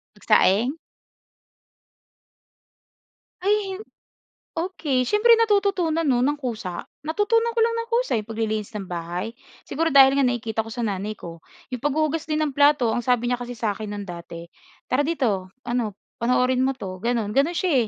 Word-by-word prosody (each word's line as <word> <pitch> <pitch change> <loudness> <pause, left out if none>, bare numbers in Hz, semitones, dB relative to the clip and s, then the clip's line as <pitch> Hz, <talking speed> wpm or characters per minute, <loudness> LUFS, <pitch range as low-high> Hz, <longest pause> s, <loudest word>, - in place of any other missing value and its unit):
Nagsaing? 220 +8 +3 2.7
Ay 405 0 +1
hin 380 - -6 0.8
okey. 315 -7 0
Siyempre 420 - +5
natututunan 395 -7 +2
'no, 250 -3 +3
nang 285 +4 +2
kusa. 215 -9 -4 0.2
Natutunan 455 +8 +1
ko - - +1
lang 460 0 +1
nang 460 0 -3
kusa, 485 - +1
'yong 210 - -8
paglilinis 220 -1 -3
ng 200 -3 -5
bahay? 175 +4 -4 0.4
Siguro 325 +4 0
dahil 270 -1 +8
nga 275 - +4
nakikita 225 -3 -1
ko - - -8
sa 240 +2 -3
nanay 205 0 -2
ko. 170 -4 -10 0.3
'Yong 250 - -3
paghuhugas 310 +2 0
din 305 0 0
ng 300 - -1
plato, 285 -5 +4
ang - - 0
sabi 245 -1 +2
niya 245 - 0
kasi 245 0 -6
sa'kin 215 -2 -3
no'n 205 0 -5
dati, 170 -1 -8 0.4
"Tara 265 +3 +3
dito 210 - -1
ano, 240 -4 -2 0.2
panoorin 250 +2 +2
mo 270 0 +1
'to." 185 -6 -7
gano'n. 230 -3 0
Gano'n 290 +6 +2
siya 275 -11 +2
250 Hz, 160 wpm, -24 LUFS, 215-315 Hz, 2.7 s, dahil